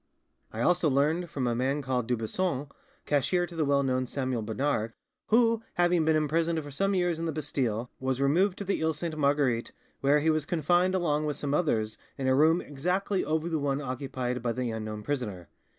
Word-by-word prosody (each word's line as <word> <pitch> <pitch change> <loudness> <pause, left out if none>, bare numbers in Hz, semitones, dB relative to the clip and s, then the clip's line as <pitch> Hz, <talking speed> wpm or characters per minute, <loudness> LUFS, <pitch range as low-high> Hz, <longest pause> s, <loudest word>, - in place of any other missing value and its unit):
"I 110 - -4
also 175 +2 +3
learned 155 +6 +1
from 135 -4 -2
a 120 - +1
man 135 +4 0
called 125 -3 -1
Dubuisson, 130 +5 -1 0.4
cashier 165 +5 +1
to 175 0 -11
the 160 - +1
well 140 -1 +2
known 130 -1 0
Samuel 130 -3 -2
Bernard, 115 0 -1 0.3
who, 230 0 +4
having 175 -2 +3
been 160 0 +3
imprisoned 160 +2 +1
for 145 - -9
some 195 +7 0
years 175 -3 +1
in 165 - -2
the - - 0
Bastile, 125 -6 -2
was 130 0 -1
removed 180 +8 +2
to - - -4
the 195 -4 -1
Iles 160 -1 0
Sainte 165 -1 -3
Marguerite, 140 -5 +1 0.3
where 140 +2 +4
he 160 +2 +2
was 155 -2 -1
confined 175 +3 +2
along 155 -4 +1
with 145 -2 -2
some 145 -1 -2
others 110 -10 0 0.2
in 135 - -3
a 130 - +4
room 160 +5 +4
exactly 180 +7 -1
over 155 +1 -1
the 160 -2 -1
one 140 -1 0
occupied 130 -2 -3
by 120 0 0
the 125 0 -2
unknown 110 -1 -5
prisoner. 105 -11 -4
145 Hz, 200 wpm, -28 LUFS, 130-165 Hz, 0.4 s, who